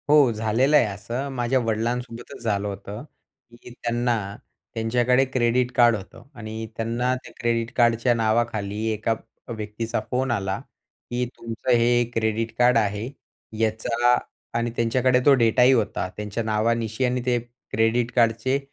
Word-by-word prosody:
हो, 145 -4 +6
झालेलं 115 +7 +2
आहे - - +4
असं. 115 +7 -4
माझ्या 125 0 +1
वडिलांसोबतच 115 +1 -3
झालं 105 -2 0
होतं 100 +2 -7 0.6
की - - -11
त्यांना 120 0 -1 0.6
त्यांच्याकडे 120 +3 +2
क्रेडिट 125 -1 +1
कार्ड 120 -1 +5
होतं. 95 -2 -10
आणि 110 -1 -6
त्यांना 120 +3 0
त्या 130 - -11
क्रेडिट 115 0 0
कार्डच्या 120 0 +3
नावाखाली 110 -2 0
एका 110 +2 0 0.4
व्यक्तीचा 110 +2 -3
फोन 130 0 0
आला 95 -4 -1 0.5
की 125 +1 -1
"तुमचं 115 +2 -3
हे 120 +1 +3
क्रेडिट 110 0 0
कार्ड 125 -1 +5
आहे 105 +1 0 0.5
याचा" 115 +2 +2 0.4
आणि 120 0 -1
त्यांच्याकडे 125 +2 +2
तो 145 - +7
डेटाही 125 0 +4
होता 110 -6 0
त्यांच्या 105 +2 -3
नावानिशी 110 +2 0
आणि 125 0 0
ते 125 -1 +2 0.3
क्रेडिट 115 +2 +1
कार्डचे 120 +3 +2
115 Hz, 135 wpm, -24 LUFS, 110-125 Hz, 0.6 s, तो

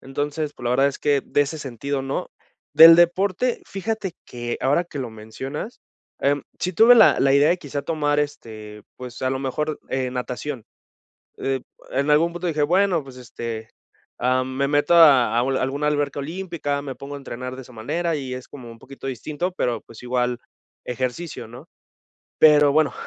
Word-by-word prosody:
entonces, 145 +2 -3
pues 125 - -11
la 120 - 0
verdad 135 +3 +3
es 140 - -6
que, 145 -2 +1
de - - +1
ese 155 +3 -5
sentido 140 +1 -4
no. 135 +1 -4 0.4
Del 165 +2 +11
deporte 185 +7 +2
fíjate 200 -1 -4
que 120 -1 -5
ahora 145 +6 +2
que 160 -4 -9
lo 130 -3 -3
mencionas, 130 - -7 0.4
em, 140 0 +1 0.2
si 185 - -2
tuve 230 +5 +7
la - - +6
la 135 0 +4
idea 140 +2 +5
de 175 - +2
quizá 145 -3 -5
tomar, 145 -2 0
este, 110 -7 -6
pues 125 -1 -9
a 130 - +1
lo 130 - -2
mejor, 150 +3 -3
eh, 130 -1 -1
natación, 125 0 -5 0.7
eh, 135 -1 -2 0.3
en 140 +2 0
algún 165 +3 +4
punto 175 +1 -4
dije: 155 -3 -1
"Bueno 180 +1 +2
pues, 135 -2 -13
este, 115 -2 -7 0.5
ah, 130 +1 +2
me 130 +1 -1
meto 145 +3 +2
a 130 -9 +6
a - - +4
alguna 135 +3 -1
alberca 145 -1 -1
olímpica, 160 -2 -3
me 135 -2 -5
pongo 140 +1 -8
a - - -6
entrenar 130 -1 -7
de 130 - -9
esa 125 - -16
manera" 160 +9 -2
y 135 -3 -5
es 130 - -9
como 125 -4 -11
un 115 - -13
poquito 135 +2 -10
distinto 150 +7 -3
pero 120 - -1
pues, 115 +1 -14
igual 125 0 -1 0.5
ejercicio, 130 +2 -4
¿no?, 125 +8 -12 0.7
pero 150 -2 +6
bueno, 155 +1 +2
140 Hz, 180 wpm, -22 LUFS, 125-155 Hz, 0.7 s, Del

